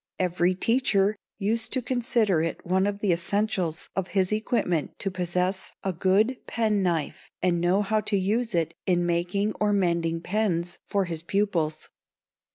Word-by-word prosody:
Every 180 Hz, 0 st, +1 dB
teacher 215 Hz, -1 st, +2 dB, 0.2 s
used 220 Hz, +2 st, -1 dB
to 260 Hz, -, +1 dB
consider 235 Hz, -8 st, +1 dB
it 165 Hz, 0 st, -3 dB
one 190 Hz, +2 st, +2 dB
of 205 Hz, 0 st, -3 dB
the 195 Hz, -4 st, +3 dB
essentials 180 Hz, -1 st, 0 dB
of 190 Hz, -1 st, -1 dB
his 185 Hz, 0 st, +2 dB
equipment 215 Hz, -7 st, 0 dB
to 195 Hz, -, -3 dB
possess 180 Hz, +1 st, -1 dB
a 190 Hz, -, -1 dB
good 200 Hz, +8 st, +2 dB
penknife 195 Hz, -9 st, 0 dB
and 175 Hz, -2 st, +2 dB
know 185 Hz, +4 st, +3 dB
how 215 Hz, +2 st, +1 dB
to 205 Hz, -, 0 dB
use 215 Hz, +3 st, 0 dB
it 165 Hz, -1 st, 0 dB
in 175 Hz, -2 st, +2 dB
making 180 Hz, +5 st, 0 dB
or 210 Hz, 0 st, +3 dB
mending 170 Hz, -4 st, +1 dB
pens 180 Hz, -2 st, -1 dB
for 200 Hz, -1 st, +1 dB
his 165 Hz, -3 st, -4 dB
pupils. 170 Hz, -4 st, -1 dB
190 Hz, 155 wpm, -26 LUFS, 175-210 Hz, 0.2 s, the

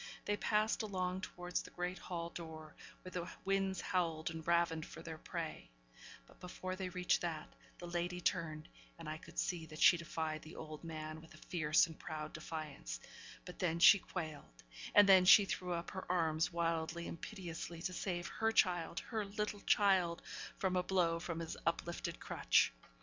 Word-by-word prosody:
They 205 Hz, -, +1 dB
passed 215 Hz, +2 st, +1 dB
along 185 Hz, -3 st, -2 dB
towards 180 Hz, -1 st, -3 dB
the -, -, -11 dB
great 180 Hz, +1 st, -3 dB
hall 170 Hz, -1 st, -4 dB
door, 160 Hz, -2 st, -8 dB, 0.3 s
where 185 Hz, -, -8 dB
the 175 Hz, -1 st, -4 dB
winds 195 Hz, -1 st, +1 dB
howled 165 Hz, -4 st, 0 dB
and 160 Hz, 0 st, -6 dB
ravened 170 Hz, -2 st, +2 dB
for -, -, -10 dB
their 160 Hz, -1 st, -7 dB
prey; -, -, -5 dB, 0.6 s
but -, -, -20 dB
before 185 Hz, +1 st, -5 dB
they 185 Hz, -1 st, -3 dB
reached 180 Hz, 0 st, +1 dB
that, 160 Hz, -3 st, -4 dB, 0.2 s
the 175 Hz, -, -8 dB
lady 175 Hz, +1 st, -2 dB
turned; 160 Hz, -3 st, -1 dB, 0.3 s
and 165 Hz, -2 st, -9 dB
I 155 Hz, +1 st, -4 dB
could 170 Hz, +1 st, -14 dB
see 175 Hz, -4 st, -1 dB
that 155 Hz, -1 st, -10 dB
she 175 Hz, -, +8 dB
defied 160 Hz, -2 st, -3 dB
the 155 Hz, -, -11 dB
old 155 Hz, 0 st, -8 dB
man 155 Hz, -1 st, -6 dB
with 160 Hz, -1 st, -15 dB
a -, -, -15 dB
fierce 155 Hz, -3 st, +4 dB
and 160 Hz, -2 st, -11 dB
proud 155 Hz, -1 st, -5 dB
defiance; 150 Hz, -, -5 dB, 0.5 s
but 180 Hz, -, -9 dB
then 170 Hz, -3 st, +1 dB
she 190 Hz, +3 st, +9 dB
quailed 155 Hz, -, -7 dB, 0.3 s
and 205 Hz, -1 st, +9 dB
then 190 Hz, -2 st, +8 dB
she 195 Hz, +2 st, +9 dB
threw 180 Hz, -2 st, -2 dB
up 170 Hz, 0 st, -4 dB
her 190 Hz, -1 st, -4 dB
arms 160 Hz, -2 st, +2 dB
wildly 170 Hz, 0 st, -1 dB
and 165 Hz, -, -7 dB
piteously 170 Hz, -4 st, -6 dB
to 185 Hz, -, -2 dB
save 175 Hz, -1 st, -2 dB
her 225 Hz, 0 st, 0 dB
child 180 Hz, -3 st, +2 dB
her 220 Hz, -3 st, -3 dB
little 210 Hz, +1 st, -3 dB
child 185 Hz, -5 st, +3 dB, 0.3 s
from 190 Hz, -1 st, 0 dB
a 180 Hz, -, +3 dB
blow 175 Hz, -2 st, +2 dB
from 170 Hz, -1 st, -4 dB
his 165 Hz, -, -4 dB
uplifted 170 Hz, +1 st, -2 dB
crutch. -, -, +3 dB
170 Hz, 180 wpm, -37 LUFS, 160-185 Hz, 0.6 s, she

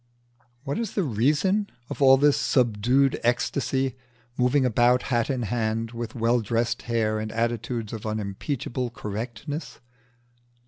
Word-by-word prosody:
What 140 Hz, +5 st, -2 dB
is 230 Hz, -4 st, -3 dB
the 195 Hz, -, +1 dB
reason 155 Hz, -, +1 dB, 0.2 s
of -, -, -7 dB
all 135 Hz, -1 st, +7 dB
this 145 Hz, +1 st, +4 dB
subdued 125 Hz, +3 st, +2 dB
ecstasy, 130 Hz, +2 st, 0 dB, 0.4 s
moving 130 Hz, +2 st, +2 dB
about, 125 Hz, +1 st, +3 dB
hat 120 Hz, -1 st, +1 dB
in 130 Hz, -3 st, -1 dB
hand, 110 Hz, +1 st, -1 dB
with 115 Hz, -2 st, -6 dB
well 120 Hz, +1 st, +2 dB
dressed 115 Hz, +2 st, -1 dB
hair 110 Hz, -2 st, +1 dB
and 110 Hz, 0 st, -4 dB
attitudes 115 Hz, 0 st, -2 dB
of 110 Hz, -1 st, -5 dB
unimpeachable 110 Hz, +4 st, -3 dB
correctness? 115 Hz, +5 st, -6 dB
120 Hz, 130 wpm, -25 LUFS, 110-135 Hz, 0.4 s, all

